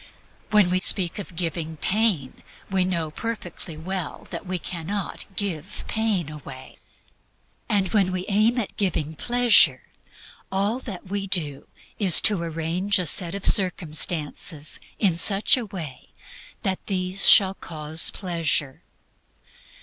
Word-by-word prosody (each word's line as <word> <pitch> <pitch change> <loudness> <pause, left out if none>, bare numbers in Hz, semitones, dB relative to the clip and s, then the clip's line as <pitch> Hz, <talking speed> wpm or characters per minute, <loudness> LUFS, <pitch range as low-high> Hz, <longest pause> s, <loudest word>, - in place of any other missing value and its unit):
When 205 -4 +4
we 185 - +2
speak 185 0 +5
of 190 -3 -8
"giving" 165 -2 -3
pain, 190 - 0 0.3
we 190 -1 +2
know 170 -4 -2
perfectly 180 -6 -6
well 180 0 -5 0.2
we 185 -1 -3
can 170 -1 -7
not 200 -1 -2
give 185 -3 -4
pain 220 -7 0
away. 135 -4 -11 0.9
And 200 -4 +1
when 195 -4 +3
we 185 0 -3
aim 215 +4 +2
at 225 -5 -3
"giving" 160 -6 -1
pleasure, 240 +6 +3 0.7
all 200 +5 0
that 200 -9 -8
we 195 +1 -4
do 155 -8 0 0.3
is 190 -6 +6
to 205 -5 +3
arrange 170 +5 -1
a 180 - -1
set 170 +3 +1
of 200 - -6
circumstances 160 -4 0 0.2
in 185 -6 +2
such 195 +4 +4
a 245 -4 -4
way 160 -10 -8
as - - -37 0.5
that 190 -1 -3
these 185 0 +2
shall 190 -2 +7
cause 160 -3 -1
pleasure. 165 -5 -2
185 Hz, 135 wpm, -24 LUFS, 160-200 Hz, 0.9 s, shall